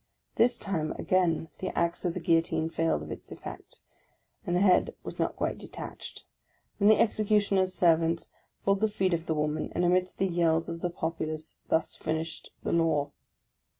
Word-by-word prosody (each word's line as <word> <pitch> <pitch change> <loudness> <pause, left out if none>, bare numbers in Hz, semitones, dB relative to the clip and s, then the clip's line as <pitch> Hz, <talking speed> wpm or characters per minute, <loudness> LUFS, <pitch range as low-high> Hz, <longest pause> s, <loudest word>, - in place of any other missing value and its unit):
This 240 +1 +3
time 165 -8 -2
again 170 -3 +1
the 185 - -2
axe 170 +2 0
of 175 - 0
the - - -2
Guillotine 165 -1 +1
failed 165 0 0
of - - -8
its - - -8
effect, - - -9 0.7
and 175 - +1
the - - +3
head 185 -3 +4
was - - -8
not - - 0
quite - - -2
detached. - - -8 0.5
Then 200 - +4
the 215 - +7
Executioner's 205 -4 +2
servants 165 -1 +2 0.3
pulled 195 0 +3
the 220 - +3
feet 190 -4 0
of 165 -1 -2
the 160 - 0
woman; 150 0 -1
and, 175 - +2
amidst 180 +1 +2
the 195 - +2
yells 170 -2 +2
of 170 0 -5
the 175 - 0
populace, 160 -2 -4
thus 160 - +1
finished 160 +1 -4
the - - -1
law 160 -4 +2
170 Hz, 175 wpm, -29 LUFS, 160-185 Hz, 0.7 s, the